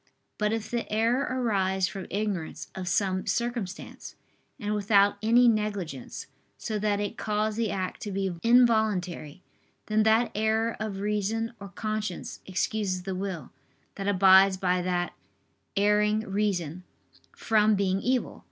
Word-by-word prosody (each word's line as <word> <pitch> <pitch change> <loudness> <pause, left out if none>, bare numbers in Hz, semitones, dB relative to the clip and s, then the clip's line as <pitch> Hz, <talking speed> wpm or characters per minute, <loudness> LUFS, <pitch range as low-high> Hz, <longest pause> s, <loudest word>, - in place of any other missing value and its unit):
But 210 0 +1
if 225 -1 -3
the 235 -2 -3
error 230 +5 +1
arise 195 -7 +1
from 195 0 -7
ignorance 200 -5 -3
of 185 -1 -6
some 185 0 0
circumstance, 220 -2 -3 0.4
and 210 -3 -2
without 205 -1 +3
any 235 +3 +5
negligence, 205 - -2 0.3
so 215 -2 -3
that 205 -1 0
it 205 -1 -4
cause 215 0 -1
the 225 -1 0
act 185 -2 -3
to 205 - -4
be 195 -1 -1
involuntary, 220 -9 +2 0.4
then 215 0 +2
that 220 +2 +3
error 220 +2 +1
of 210 -3 -4
reason 210 +3 -1
or 200 0 -8
conscience 215 -2 -4
excuses 190 -1 -1
the 190 0 -3
will, 185 -6 -5 0.4
that 195 0 -5
abides 190 0 +6
by 180 -1 +1
that 175 -1 -1 0.6
erring 210 +1 +3
reason, 190 -5 -2 0.5
from 215 -1 +3
being 195 -1 0
evil. 255 0 -1
205 Hz, 135 wpm, -27 LUFS, 190-220 Hz, 0.6 s, abides